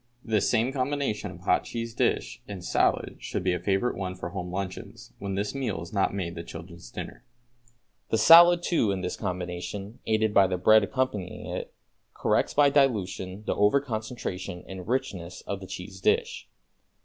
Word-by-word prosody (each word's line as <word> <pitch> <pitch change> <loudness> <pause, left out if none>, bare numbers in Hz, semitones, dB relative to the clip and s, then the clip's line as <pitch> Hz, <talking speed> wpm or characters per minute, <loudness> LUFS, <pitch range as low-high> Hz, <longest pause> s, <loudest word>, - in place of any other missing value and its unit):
This 110 -3 +2
same 120 +2 +2
combination 140 -4 -1
of - - -11
hot - - +2
cheese 115 -1 -5
dish - - 0
and 95 -3 -7
salad - - +1
should - - -4
be 90 -1 +2
a 90 - -1
favorite 100 +7 0
one 95 -1 -4
for 85 -1 -5
home 90 0 -5
luncheons, 95 0 -6
when 100 -1 -3
this 100 +1 -2
meal 125 -10 -2
is 85 - -11
not 100 -2 +2
made 95 -4 -3
the 85 - -6
children's 85 -4 -10
dinner. 120 - -8 0.9
The 110 - +2
salad 175 +5 +8
too 160 - +2
in 95 -1 -2
this 90 0 -3
combination, 90 +2 -5
aided 110 -1 +2
by 100 -2 +6
the 90 0 -1
bread 110 +4 +6
accompanying 110 -6 -2
it, - - -5 0.4
corrects - - +1
by 145 -1 +5
dilution 105 -8 +1
the - - 0
over 105 +7 +4
concentration 110 -7 -5
and 95 -1 -8
richness 95 -8 -3
of 100 - -5
the 95 - -9
cheese 90 +1 -8
dish. - - 0
100 Hz, 175 wpm, -27 LUFS, 90-115 Hz, 0.9 s, salad